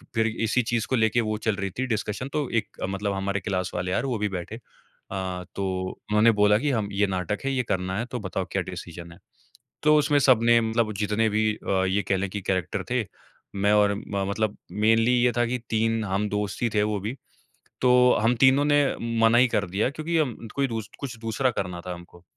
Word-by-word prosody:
फिर 115 0 +2
इसी 115 +2 0
चीज़ 115 0 -1
को 130 - +2
लेके 110 +1 +2
वो 110 -1 -2
चल 110 - +2
रही 100 0 -3
थी 130 - +1
डिस्कशन 110 +2 -2
तो 150 -4 -1
एक 115 -1 0 0.2
मतलब 100 +1 -2
हमारे 100 +1 -2
क्लास 95 -2 -2
वाले 90 +1 -2
यार 135 - 0
वो 125 -4 -1
भी 105 0 0
बैठे। 95 +3 -5 0.6
अ, 95 -2 -3
तो 100 - -2 0.2
उन्होंने 105 +2 +2
बोला 105 0 +5
कि 145 - 0
"हम 110 -4 0
ये 100 0 +2
नाटक 95 +2 -2
है, 135 - +1
ये 125 -1 0
करना 95 0 -1
है 120 - -2
तो 125 - -3
बताओ 95 -5 -3
क्या - - 0
डिसीज़न 85 0 -8
है।" 85 - -14 0.7
तो 150 0 +5
उसमें 145 0 +3
सबने 120 -3 +5
मतलब 110 -1 0
जितने 105 +2 +1
भी 110 0 +2
अ, 95 -2 -1
ये 95 +2 +1
कहले 95 0 0
कि 100 +2 -5
कैरेक्टर 95 -3 -2
थे, - - +1 0.5
मैं 100 +1 +2
और 105 -1 +4
म 100 -1 -3
मतलब 110 0 -1 0.2
मेनली 115 +4 +3
ये 125 -1 +3
था 120 - +3
कि 125 +2 -2
3 115 0 +1
हम 100 +2 -1
दोस्त 105 +1 -3
ही 120 - +2
थे 105 - +3
वो 105 -1 0
भी। 110 +7 -4 0.7
तो 125 -1 +4 0.3
हम 120 +2 +3
तीनों 135 +3 +5
ने 145 0 +4 0.4
मना 115 +1 +5
ही 125 - +6
कर 100 -2 0
दिया 100 +7 0
क्योंकि 155 +3 -2
हम 140 -8 0 0.2
कोई 140 -1 +1
दूस 110 -3 -5
कुछ 130 -4 -6
दूसरा 115 +3 0
करना 90 -5 -4
था 90 0 -5
हमको। 85 0 -13
110 Hz, 215 wpm, -25 LUFS, 100-120 Hz, 0.7 s, ही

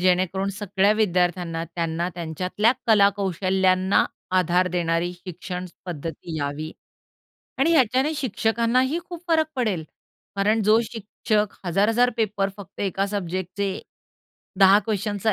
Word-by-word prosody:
जेणेकरून 185 +1 +1
सगळ्या 200 0 +1
विद्यार्थ्यांना 180 -5 0
त्यांना 170 +1 -2
त्यांच्यातल्या 180 +7 0
कलाकौशल्यांना 190 -2 +3 0.3
आधार 180 +1 +2
देणारी 175 0 0
शिक्षण 180 +1 -7 0.2
पद्धती 165 -1 -6
यावी." 145 +2 -4 0.9
आणि 300 +5 +3
ह्याच्याने 265 +1 +3
शिक्षकांनाही 250 - +1
खूप 345 -1 -8
फरक 320 -1 +3
पडेल. 205 -10 -1 0.5
कारण 210 +3 +2
जो 215 +2 +5
शिक्षक 215 -2 -2
1000-1000 215 +7 +3
पेपर 205 -3 0
फक्त 200 -3 -11
एका 195 0 0
सब्जेक्टचे 190 0 -3 0.8
10 195 0 +7
क़्वश्चनचा 210 -1 -1
195 Hz, 105 wpm, -24 LUFS, 180-215 Hz, 0.9 s, 10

